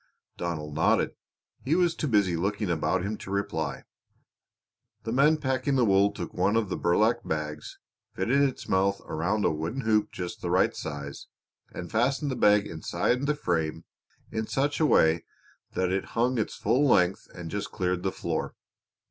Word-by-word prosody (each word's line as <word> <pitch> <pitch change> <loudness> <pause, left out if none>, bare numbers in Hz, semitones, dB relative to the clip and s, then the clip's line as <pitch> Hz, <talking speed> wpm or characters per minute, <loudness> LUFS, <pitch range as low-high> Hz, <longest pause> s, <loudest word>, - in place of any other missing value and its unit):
Donald 75 -4 -4
nodded. 80 - +2 0.5
He 145 +5 +1
was 175 -2 +3
too 155 - -3
busy 100 -7 +2
looking 100 +2 -1
about 85 +3 0
him 105 +2 -3
to - - -10
reply. 80 -7 -2 1.2
The 115 - -3
men 145 +6 +4
packing 130 -1 0
the 125 -2 +4
wool 100 0 +4
took 85 - -6
one 95 +4 +1
of 115 -4 +1
the - - -1
burlap 110 +7 +2
bags, 75 -1 -4 0.4
fitted 120 +9 +2
its 135 -2 0
mouth 100 +1 +2
over 80 - -5
a 105 +3 +1
wooden 80 - -3
hoop 110 -3 +1
just 90 -1 -6
the 85 - -3
right 90 +2 +3
size, 70 -2 -6 0.4
and 90 - -7
fastened 135 +5 +1
the - - -2
bag 105 -2 +4
inside 120 - -1
the 150 - +2
frame 80 - -2 0.5
in 110 0 -2
such 145 +2 0
a 155 - +4
way 80 - +4 0.5
that 95 0 0
it 95 0 -1
hung 120 +1 +2
its 110 - -2
full 120 +7 +2
length 90 -6 +3
and 85 -2 -7
just 100 0 -4
cleared 90 -1 -1
the 95 +1 -1
floor. - - -3
100 Hz, 175 wpm, -27 LUFS, 85-125 Hz, 1.2 s, men